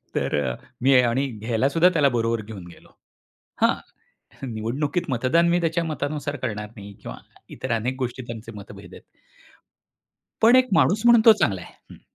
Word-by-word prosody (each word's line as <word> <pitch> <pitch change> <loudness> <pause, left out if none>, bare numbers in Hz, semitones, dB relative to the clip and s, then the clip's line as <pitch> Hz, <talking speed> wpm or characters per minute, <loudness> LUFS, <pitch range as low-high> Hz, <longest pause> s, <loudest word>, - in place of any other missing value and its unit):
तर - - -1 0.5
मी 135 +2 +4
आणि 125 +3 0
घ्यायला 115 +2 -1
सुद्धा 170 +4 +4
त्याला 150 -6 +2
बरोबर 115 -2 -1
घेऊन 100 -4 -10
गेलो. 85 - -16 0.7
हां, - - +4 0.8
निवडणुकीत 140 +9 -2
मतदान 130 +8 +2
मी 175 +1 +2
त्याच्या 165 0 0
मतानुसार 145 -2 -3
करणार 105 -2 -4
नाही 100 0 -10
किंवा - - -8 0.4
इतर 130 - -4
अनेक 120 +3 -1
गोष्टी 130 0 -4
त्यांचे 115 -1 -8
मतभेद 100 -1 -12
आहेत. - - -14 1.4
पण 235 +3 +7
एक 255 0 +4
माणूस 190 +5 +3
म्हणून 235 -1 +7
तो 225 - +10
चांगला 100 - 0
आहे. - - -13 0.2
हं. - - -14
130 Hz, 160 wpm, -23 LUFS, 110-165 Hz, 1.4 s, तो